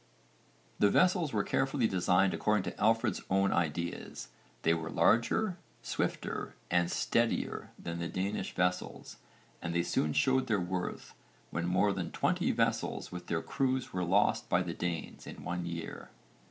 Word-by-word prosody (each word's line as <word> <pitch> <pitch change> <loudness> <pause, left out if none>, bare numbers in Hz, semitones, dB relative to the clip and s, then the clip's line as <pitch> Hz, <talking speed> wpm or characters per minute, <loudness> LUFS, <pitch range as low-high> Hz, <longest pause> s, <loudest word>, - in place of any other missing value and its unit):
The 105 - +5
vessels 180 - +3
were - - +1
carefully 135 -2 +1
designed 95 0 +3
according 105 -2 +1
to - - -6
Alfred's 115 +2 +2
own 95 +1 +3
ideas: 85 +1 -2 0.3
they 80 - +4
were 80 -1 -3
larger, 180 - +2 0.2
swifter - - -2 0.2
and 85 0 +3
steadier 115 0 0
than 85 0 -5
the 85 - -2
Danish 95 +2 -3
vessels 90 0 -1 0.4
and 85 - -3
they 85 - +3
soon 75 -2 0
showed 130 - +3
their 110 -3 +2
worth 90 0 -4 0.4
when 85 0 -1
more 100 +3 +3
than 90 -4 -3
20 - - +1
vessels - - 0
with 90 -1 -7
their 80 -1 -1
crews 130 -1 -1
were 90 -1 -1
lost 95 +4 +2
by 90 +1 +3
the 85 -1 -4
Danes 85 -2 -4
in - - -9
one 90 0 -3
year. 85 -1 -6
90 Hz, 155 wpm, -32 LUFS, 85-110 Hz, 0.4 s, The